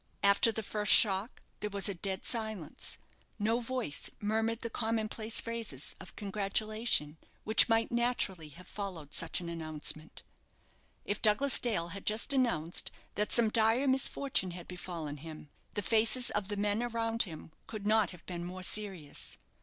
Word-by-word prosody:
After 200 +3 +5
the 220 0 -4
first 210 0 0
shock 200 +2 +4 0.2
there 210 - -3
was 200 -1 +2
a 200 - 0
dead 190 +1 -4
silence; 220 - -3 0.4
no 225 +3 +1
voice 245 - -1
murmured 220 +2 -1
the 230 - -4
common 225 -1 -1
place 220 +1 0
phrases 230 - -3
of 180 - -12
congratulation 205 -4 0 0.3
which 220 +2 +6
might 225 0 +2
naturally 235 -9 0
have 175 +5 -14
followed 180 -8 -7
such - - 0
an 175 - -7
announcement. 155 -1 -6 0.8
If 205 - -3
Douglas 235 +6 +4
Dale 190 -8 0
had 195 +3 -9
just 220 +6 +3
announced 230 - 0 0.2
that 210 +1 -1
some 235 -2 +5
dire 225 +4 +3
misfortune 265 -5 +2
had 175 - -10
befallen 170 -5 -6
him, 155 -1 -10 0.2
the 205 - -1
faces 230 +3 +4
of 205 -2 -2
the 205 0 -4
men 205 +2 0
around 230 -1 -1
him 160 -4 -4 0.2
could 215 -2 -7
not 215 -3 +3
have 180 -1 -12
been 175 -2 -5
more 185 +1 -7
serious. 190 -7 0
210 Hz, 160 wpm, -32 LUFS, 180-225 Hz, 0.8 s, which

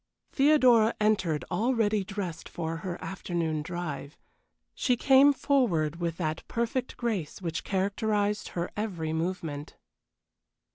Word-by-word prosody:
Theodora 255 -6 +5
entered 200 -8 +1
already 215 0 +1
dressed 190 -4 -5
for 165 -1 -4
her 175 +1 -5
afternoon 170 -4 -2
drive. 155 -3 -5 0.6
She 250 -2 +1
came 270 +3 +6
forward 205 - +1
with 170 -1 -2
that 155 -2 -2
perfect 235 +2 -2
grace 210 -11 -2
which 165 -2 -3
characterized 205 +1 0
her 170 +1 -2
every 175 -7 -3
movement. 160 -3 -3
190 Hz, 110 wpm, -28 LUFS, 165-225 Hz, 0.6 s, came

